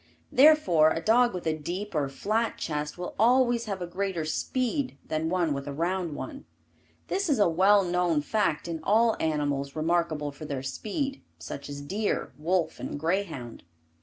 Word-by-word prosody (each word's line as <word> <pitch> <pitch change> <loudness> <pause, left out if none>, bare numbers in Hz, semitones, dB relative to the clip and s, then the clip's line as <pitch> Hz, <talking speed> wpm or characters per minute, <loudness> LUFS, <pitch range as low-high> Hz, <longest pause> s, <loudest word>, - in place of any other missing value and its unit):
Therefore, 255 - +6
a 165 - -1
dog 240 +6 +4
with 180 -2 -6
a 160 -1 +1
deep 180 +7 -5
or 145 -4 0
flat 215 +11 -1
chest 150 0 -3
will 180 - -5
always 240 0 +4
have 195 -4 -4
a - - -2
greater 180 -2 -2
speed 255 - -1
than 160 +1 -1
one 175 -4 +1
with 140 0 -5
a 145 - -4
round 170 +1 -1
one. 285 - -7 0.6
This 390 -2 -1
is 285 - +3
a 205 - +4
well 195 +4 +4
known 175 -3 +1
fact 170 -4 0
in 165 -1 -3
all 225 +4 +3
animals 145 -3 -1
remarkable 160 -2 0
for 145 +2 -10
their 140 -3 -4
speed, 270 - -3 0.2
such 140 - -7
as 145 0 -6
deer, 200 +9 -2
wolf 175 +2 0
and - - -5
greyhound. 160 - -2
175 Hz, 170 wpm, -27 LUFS, 155-215 Hz, 0.6 s, Therefore